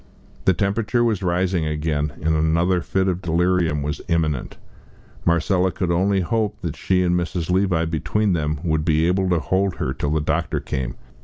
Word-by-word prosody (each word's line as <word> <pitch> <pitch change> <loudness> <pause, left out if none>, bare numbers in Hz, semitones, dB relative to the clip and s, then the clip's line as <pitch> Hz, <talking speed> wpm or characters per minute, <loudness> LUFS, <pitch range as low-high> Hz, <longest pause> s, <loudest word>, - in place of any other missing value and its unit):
The 95 - +4
temperature 105 +6 0
was 110 -5 +1
rising 90 -2 0
again, 75 -1 -1
and 80 +1 +2
another 85 +3 +2
fit 95 +3 0
of 90 -1 -1
delirium 85 -3 +1
was 75 +2 -3
imminent. 80 -5 -1 0.7
Marcella 90 +2 +2
could 90 -2 -2
only 95 +3 +2
hope 110 +3 -1
that - - -4
she 90 -1 +1
and 90 -1 +1
Mrs. 90 -1 -1
Levi 90 -3 +2
between 95 +6 0
them 75 -2 -1
would 80 -3 0
be 80 0 +2
able 95 +2 +1
to 85 -2 +2
hold 95 +2 0
her - - -2
till 70 - -2
the 80 +1 +1
doctor 80 +1 -1
came. 65 -3 -4
85 Hz, 175 wpm, -22 LUFS, 80-95 Hz, 0.7 s, The